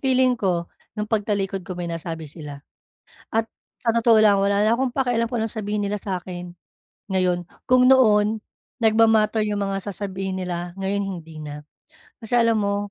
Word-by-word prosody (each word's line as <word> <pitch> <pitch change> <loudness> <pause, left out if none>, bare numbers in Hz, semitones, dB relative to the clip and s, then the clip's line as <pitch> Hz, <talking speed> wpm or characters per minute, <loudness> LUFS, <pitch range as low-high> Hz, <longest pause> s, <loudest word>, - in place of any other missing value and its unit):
feeling 260 -1 +3
ko 175 -5 0 0.3
nong 210 0 -3
pagtalikod 200 -3 0
ko 185 - -5
may 175 -1 -4
nasabi 165 -1 -5
sila. 145 -2 -9 0.7
At 225 0 +1 0.4
sa 230 - +3
totoo 230 -1 +5
lang, 205 -2 +5
wala 200 +1 +2
na 215 - +3
akong 260 +2 +1
pakialam 245 -3 +1
kung 230 -2 -2
anong 225 - -2
sabihin 210 0 -2
nila 205 +1 -2
sa'kin 180 -2 -6 0.6
ngayon. 180 -2 0 0.2
Kung 255 0 +5
noon 215 -4 +5 0.4
nagma-matter 220 -1 +4
'yong 210 -1 -1
mga 195 0 -1
sasabihin 195 -1 -4
nila, 175 -1 -4
ngayon 195 +1 -1
hindi 165 -5 -7
na. 150 0 -8 0.6
Kasi 235 +2 +1
alam 230 -2 +3
mo 200 0 -1
200 Hz, 165 wpm, -23 LUFS, 180-225 Hz, 0.7 s, totoo